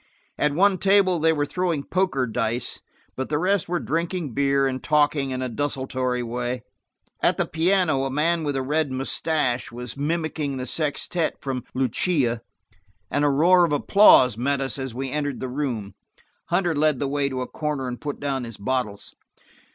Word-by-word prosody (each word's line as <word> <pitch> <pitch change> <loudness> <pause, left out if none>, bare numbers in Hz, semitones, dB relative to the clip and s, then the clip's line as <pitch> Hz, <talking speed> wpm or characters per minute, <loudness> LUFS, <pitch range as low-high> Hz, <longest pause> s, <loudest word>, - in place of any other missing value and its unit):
At 150 -1 +2
one 190 +1 +3
table 195 -3 +4
they 160 +1 +4
were 145 -2 0
throwing 170 -3 -1
poker 180 -6 0
dice, 115 +1 -2 0.3
but 130 - -4
the 150 - +1
rest 185 +1 +1
were 175 0 0
drinking 165 -3 -2
beer 140 0 +2
and 130 -1 -2
talking 145 -2 +2
in 130 0 -3
a - - -1
desultory 130 -1 -2
way. 120 +1 -3 0.6
At - - +3
the - - +1
piano 160 -4 +1
a - - -1
man 160 +4 +1
with 145 -2 -1
a 135 - -1
red 150 +1 0
mustache 130 -1 -1
was 125 0 -7
mimicking 150 -1 -2
the 125 - -4
sextette 155 +4 -2
from 130 -3 -4
Lucia 130 -1 +1 0.7
and 145 - +1
a 145 - +4
roar 175 +6 +5
of 170 - +1
applause 145 - +5
met 140 +3 +1
us 135 0 -2
as 130 -3 -5
we 135 +1 -3
entered 145 -2 -2
the 130 - -3
room. 125 -7 -3 0.5
Hunter 175 -1 +1
led 155 -1 +2
the 140 - -1
way 140 0 0
to 130 -1 -3
a 125 - -3
corner 150 -4 -3
and 125 -1 -6
put 145 -1 -4
down 135 -2 -2
his 115 -3 -7
bottles. 110 -2 -3
140 Hz, 180 wpm, -24 LUFS, 130-160 Hz, 0.7 s, roar